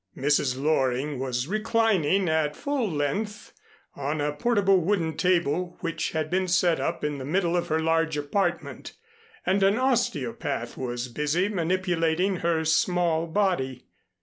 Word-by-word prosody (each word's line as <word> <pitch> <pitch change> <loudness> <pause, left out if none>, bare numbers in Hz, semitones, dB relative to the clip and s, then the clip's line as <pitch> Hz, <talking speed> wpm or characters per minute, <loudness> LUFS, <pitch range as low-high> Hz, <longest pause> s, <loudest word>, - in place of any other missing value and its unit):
Mrs. 135 -2 +1
Loring 135 -1 0
was 125 -1 -2
reclining 205 -3 +1
at 155 -2 +1
full 280 -6 -1
length 200 +8 -3 0.4
on 145 +2 -3
a 145 0 0
portable 195 +2 +3
wooden 165 -3 0
table 175 0 0
which 165 - -2
had 155 -1 -1
been 185 +1 +1
set 175 -2 +2
up 165 0 -2
in 150 -1 -2
the - - -5
middle 175 +4 0
of 175 - 0
her 160 0 +1
large 165 -1 +1
apartment, 170 +5 -2 0.5
and 195 +2 +2
an 195 +2 +4
osteopath 155 - -1
was 120 -1 -4
busy 150 +9 0
manipulating 180 -1 0
her 165 -1 0
small 170 0 +1
body. 160 -9 -1
165 Hz, 140 wpm, -26 LUFS, 145-190 Hz, 0.5 s, an